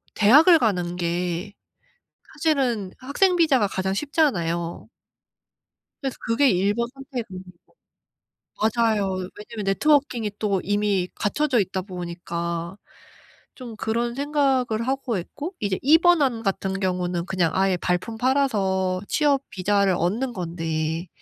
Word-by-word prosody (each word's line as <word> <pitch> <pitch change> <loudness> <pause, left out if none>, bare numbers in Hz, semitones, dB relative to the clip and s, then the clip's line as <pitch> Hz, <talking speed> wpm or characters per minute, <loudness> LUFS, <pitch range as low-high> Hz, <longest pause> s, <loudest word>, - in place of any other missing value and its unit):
대학을 300 - +7
가는 180 -6 0
게 175 +3 -2 0.8
사실은 265 - 0
학생 355 +8 +2
비자가 275 -11 +3
가장 190 0 -2
쉽잖아요. 175 - -1 1.2
그래서 270 -2 -3
그게 250 +4 +3
1 195 +3 +2
번 235 +1 -1
선택 270 -3 -6
안이고 185 0 -9 1.3
맞아요. 215 -5 +1 0.2
왜냐면 215 0 -7
네트워킹이 245 0 +2
또 200 -3 0
이미 205 -2 0
갖춰져 260 +3 +1
있다 190 -1 -1
보니까. 170 -1 -5 0.8
좀 240 -4 -9
그런 235 +3 -2
생각을 270 -5 0
하고 265 -5 -1
있고 295 - -7
이제 200 -2 -1
2 305 +4 +7
번 350 -3 +4
안 235 -4 0
같은 195 -1 -2
경우는 180 -2 -1
그냥 180 -4 0
아예 190 0 +2
발품 180 +6 -2
팔아서 195 -9 +1
취업 285 -3 +2
비자를 195 0 +1
얻는 225 +10 -1
건데 165 -2 -3
205 Hz, 255 characters per minute, -24 LUFS, 185-265 Hz, 1.3 s, 대학을